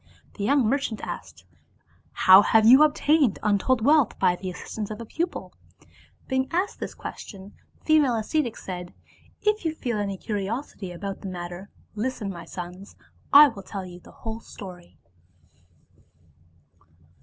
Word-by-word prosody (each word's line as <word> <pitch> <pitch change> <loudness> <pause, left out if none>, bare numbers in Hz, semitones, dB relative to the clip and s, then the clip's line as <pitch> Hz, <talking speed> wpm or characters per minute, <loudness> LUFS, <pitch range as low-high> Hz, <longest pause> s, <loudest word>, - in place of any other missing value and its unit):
The 200 - -6
young 265 +1 +3
merchants 255 -3 -1
asked, - - -8 0.4
" - - -36
How 190 +1 +10
have 220 +1 +4
you 255 +5 +8
obtained 300 -4 +3
untold 220 +3 +1
wealth 295 -4 +4
by 180 - +3
the 185 +1 -6
assistance 205 +3 -6
of 215 - -6
a 230 - -7
pupil? 340 +9 -4 0.4
" - - -29
Being 260 0 0
asked 370 +4 -1
this - - -6
question, 195 -1 -9 0.3
the - - -30
female 300 -6 +4
ascetic 235 +2 -1
said, 180 -1 -7 0.2
" - - -30
If 425 -1 +1
you 320 -1 -2
feel 240 -7 -3
any 200 -1 -2
curiosity 205 0 -4
about 195 +3 -6
the 195 - -6
matter, 175 +2 -7 0.2
listen, 215 -2 -3
my 170 -2 -9
sons, 180 +3 -9 0.4
I 290 +1 +9
will 210 -6 -9
tell 195 0 -7
you 175 -1 -11
the - - -17
whole 225 0 -4
story. 180 -6 -12
215 Hz, 155 wpm, -25 LUFS, 190-265 Hz, 0.4 s, How